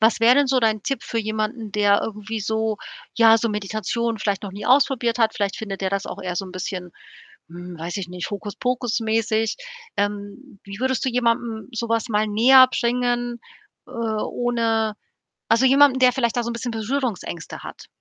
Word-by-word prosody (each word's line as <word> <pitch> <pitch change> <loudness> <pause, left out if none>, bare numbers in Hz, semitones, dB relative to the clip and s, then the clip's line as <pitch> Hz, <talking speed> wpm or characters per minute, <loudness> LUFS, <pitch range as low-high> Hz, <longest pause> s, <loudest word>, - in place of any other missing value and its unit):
was 225 +1 +3
wäre 240 +3 +6
denn 285 - +4
so 260 -1 +2
dein 215 -2 +1
Tipp 275 +4 -2
für 230 - -3
jemanden, 215 0 -3
der 205 -1 +3
irgendwie 220 +1 -5
so 220 +1 -1 0.4
ja, 225 -1 +7
so 230 +1 -1
Meditation 215 +2 -2
vielleicht 205 -1 -1
noch 195 - -6
nie 205 +2 -7
ausprobiert 250 -3 +3
hat? 225 -1 +2
Vielleicht 205 -4 -1
findet 200 -3 -6
der 190 -1 -1
das 195 0 -2
auch - - -7
eher 180 -1 -3
so 195 - -2
'n 185 - -10
bisschen, 180 -1 -5 0.6
hm, 175 0 -9
weiß 170 +4 -4
ich 190 -3 -5
nicht, 180 -1 -6
Hokuspokus 235 +4 -2
mäßig. 225 0 0 0.4
Ähm, 205 +3 -4
wie 200 0 -9
würdest 260 -1 0
du - - +1
jemandem 235 -2 -1
so 235 0 -3
was 230 +1 0
mal 215 -1 +1
näherbringen, 245 +1 +4 0.5
äh, - - -14
ohne 225 0 -1 0.6
also 230 +3 +4
jemandem, 270 0 +5
der 255 -1 +6
vielleicht 240 -2 0
da 240 - +1
so 235 - -3
'n - - -3
bisschen 235 +1 -4
Berührungsängste 225 - -4
hat? - - -10
225 Hz, 185 wpm, -22 LUFS, 205-240 Hz, 0.6 s, ja